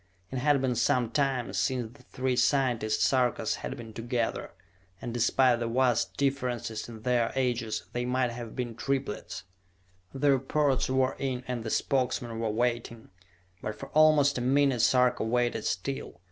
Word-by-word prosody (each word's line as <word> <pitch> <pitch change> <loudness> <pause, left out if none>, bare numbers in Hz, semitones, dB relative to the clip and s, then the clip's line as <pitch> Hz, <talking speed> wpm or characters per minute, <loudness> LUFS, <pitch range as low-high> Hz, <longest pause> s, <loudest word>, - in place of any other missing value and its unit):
It 130 - -2
had 145 +1 +3
been 130 -1 +1
some 120 -1 +1
time 135 -2 0
since 125 -3 -1
the 140 - -17
three 130 0 -2
scientist 120 -4 +1
Sarkas 125 -4 +1
had 135 - -6
been 115 -2 -9
together, 120 +1 -2 0.5
and 120 - -5
despite 120 +1 +3
the 120 - -2
vast 125 +1 +1
differences 125 -5 -2
in 110 -2 -10
their 120 -2 +1
ages 120 -4 -1
they 120 - -1
might 125 0 0
have 115 -1 -7
been 120 -2 -3
triplets! 130 -3 -3 0.7
The 140 +1 +2
reports 135 0 +1
were 130 0 +1
in 130 -2 -2
and 125 -2 -3
the 110 - -4
Spokesmen 125 -3 -1
were 115 -1 -1
waiting; 115 0 -2 0.5
but 105 - -4
for - - -9
almost 150 -3 +4
a - - -3
minute 135 -1 +2
Sarka 125 +1 +3
waited 120 -1 0
still. 90 0 -3
125 Hz, 160 wpm, -28 LUFS, 115-135 Hz, 0.7 s, almost